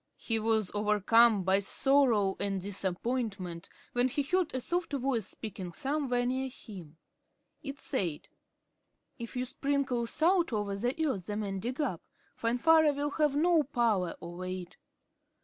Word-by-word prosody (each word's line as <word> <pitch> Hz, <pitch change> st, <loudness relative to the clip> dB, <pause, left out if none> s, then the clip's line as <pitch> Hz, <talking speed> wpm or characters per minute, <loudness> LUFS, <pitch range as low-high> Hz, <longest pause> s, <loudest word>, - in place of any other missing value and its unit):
He 225 Hz, -1 st, -1 dB
was 220 Hz, -3 st, +1 dB
overcome 210 Hz, +1 st, +4 dB
by 190 Hz, +2 st, +3 dB
sorrow 225 Hz, -2 st, +3 dB
and 195 Hz, -1 st, -1 dB
disappointment, 195 Hz, -1 st, -3 dB, 0.2 s
when 245 Hz, +1 st, +3 dB
he 280 Hz, +3 st, -1 dB
heard 360 Hz, +3 st, +1 dB
a 260 Hz, -, -2 dB
soft 345 Hz, +4 st, -2 dB
voice 255 Hz, -6 st, 0 dB
speaking 190 Hz, -6 st, -7 dB
somewhere 260 Hz, -, -1 dB
near 260 Hz, +1 st, -1 dB
him. 180 Hz, -, -12 dB, 0.6 s
It 275 Hz, -1 st, -6 dB
said: 180 Hz, -, -3 dB, 0.9 s
"If 235 Hz, +1 st, -7 dB
you 250 Hz, 0 st, -1 dB
sprinkle 265 Hz, -3 st, -1 dB
salt 340 Hz, +5 st, +2 dB
over 205 Hz, -2 st, -1 dB
the 245 Hz, +10 st, -1 dB
earth 195 Hz, -10 st, -3 dB
the 210 Hz, -, -3 dB
men 195 Hz, -2 st, -3 dB
dig 245 Hz, +7 st, -4 dB
up, 250 Hz, -, -1 dB, 0.3 s
Finvarra 300 Hz, +6 st, +4 dB
will 290 Hz, +1 st, -1 dB
have 300 Hz, -2 st, +1 dB
no 330 Hz, +2 st, +4 dB
power 230 Hz, -, 0 dB
over 175 Hz, +2 st, -6 dB
it." 185 Hz, -1 st, -6 dB
235 Hz, 145 wpm, -31 LUFS, 195-275 Hz, 0.9 s, overcome